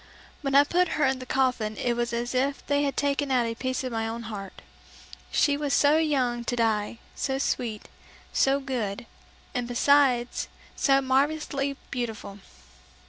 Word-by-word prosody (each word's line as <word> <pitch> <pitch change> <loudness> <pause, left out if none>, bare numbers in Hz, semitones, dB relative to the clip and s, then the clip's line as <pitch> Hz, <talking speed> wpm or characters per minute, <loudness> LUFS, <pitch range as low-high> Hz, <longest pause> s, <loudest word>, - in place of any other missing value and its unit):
When 275 -2 -1
I 285 - +8
put 355 +3 +1
her 300 - +3
in 265 -1 +1
the 255 - -8
coffin 250 -5 0
it 245 - 0
was 240 0 -1
as 240 +1 -2
if 275 +2 0
they 285 0 +1
had 280 -1 -1
taken 285 0 0
out 250 -3 +2
a 230 - -2
piece 255 +2 -3
of 255 - -3
my 225 -1 -1
own 230 +1 -5
heart. 205 -4 -8 0.7
She 285 - +3
was 290 -1 0
so 290 +2 +5
young 255 -6 +1
to 245 - -1
die, 225 -1 0 0.2
so 265 -1 -2
sweet, 235 -5 -2 0.5
so 270 +1 +3
good, 240 -6 -3 0.5
and 245 -1 -2
besides 250 -1 +3 0.3
so 275 -1 +3
marvelously 275 +1 0
beautiful! 225 -5 -4
255 Hz, 165 wpm, -27 LUFS, 235-280 Hz, 0.7 s, I